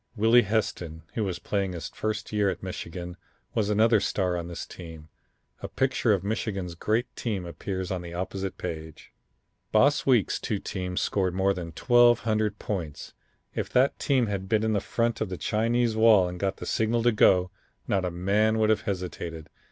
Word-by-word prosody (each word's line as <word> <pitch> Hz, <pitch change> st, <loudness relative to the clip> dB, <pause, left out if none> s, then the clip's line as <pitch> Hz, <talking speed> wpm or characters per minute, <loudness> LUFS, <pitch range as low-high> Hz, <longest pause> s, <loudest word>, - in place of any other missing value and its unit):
Willie 115 Hz, +3 st, +5 dB
Heston, 95 Hz, -7 st, -2 dB
who 110 Hz, -, -1 dB
was 95 Hz, -4 st, -2 dB
playing 100 Hz, -1 st, -2 dB
his 80 Hz, -2 st, -5 dB
first 110 Hz, 0 st, -4 dB
year 105 Hz, -2 st, +2 dB
at -, -, -5 dB
Michigan, 90 Hz, -1 st, -6 dB, 0.4 s
was 105 Hz, -2 st, 0 dB
another 110 Hz, +1 st, +4 dB
star 95 Hz, -2 st, 0 dB
on 85 Hz, -1 st, -4 dB
this 85 Hz, -1 st, -6 dB
team. 80 Hz, -3 st, -11 dB, 0.5 s
A -, -, -4 dB
picture 130 Hz, -3 st, +1 dB
of 95 Hz, -3 st, +1 dB
Michigan's 100 Hz, -4 st, -3 dB
great 110 Hz, +8 st, -1 dB
team 100 Hz, -7 st, -3 dB
appears 95 Hz, +2 st, -4 dB
on 90 Hz, -2 st, -2 dB
the 85 Hz, -1 st, -8 dB
opposite 95 Hz, +1 st, -4 dB
page. 80 Hz, -3 st, -7 dB, 0.6 s
"Boss 140 Hz, +7 st, +4 dB
Weeks' 120 Hz, -8 st, +2 dB
two -, -, -2 dB
teams 90 Hz, -1 st, -3 dB
scored 95 Hz, -3 st, 0 dB
more 95 Hz, +1 st, +2 dB
than 90 Hz, -3 st, -5 dB
1200 110 Hz, -, +3 dB
points. 85 Hz, -8 st, -5 dB, 0.4 s
If -, -, -3 dB
that 130 Hz, +2 st, +3 dB
team 130 Hz, -4 st, +2 dB
had 95 Hz, -3 st, -4 dB
been 110 Hz, -1 st, +2 dB
in 110 Hz, -2 st, +1 dB
front 115 Hz, +3 st, -1 dB
of 110 Hz, -, -1 dB
the 90 Hz, -, -4 dB
Chinese 115 Hz, +3 st, +1 dB
Wall 110 Hz, -4 st, +6 dB
and 90 Hz, 0 st, -6 dB
got 95 Hz, 0 st, -1 dB
the -, -, -7 dB
signal 115 Hz, +1 st, +1 dB
to 120 Hz, -, +5 dB
go, 90 Hz, -4 st, +4 dB, 0.4 s
not 95 Hz, -2 st, +1 dB
a 90 Hz, -, 0 dB
man 100 Hz, +5 st, +1 dB
would 110 Hz, 0 st, +3 dB
have 110 Hz, -, +2 dB
hesitated. 85 Hz, -4 st, -5 dB
100 Hz, 180 wpm, -27 LUFS, 90-110 Hz, 0.6 s, Wall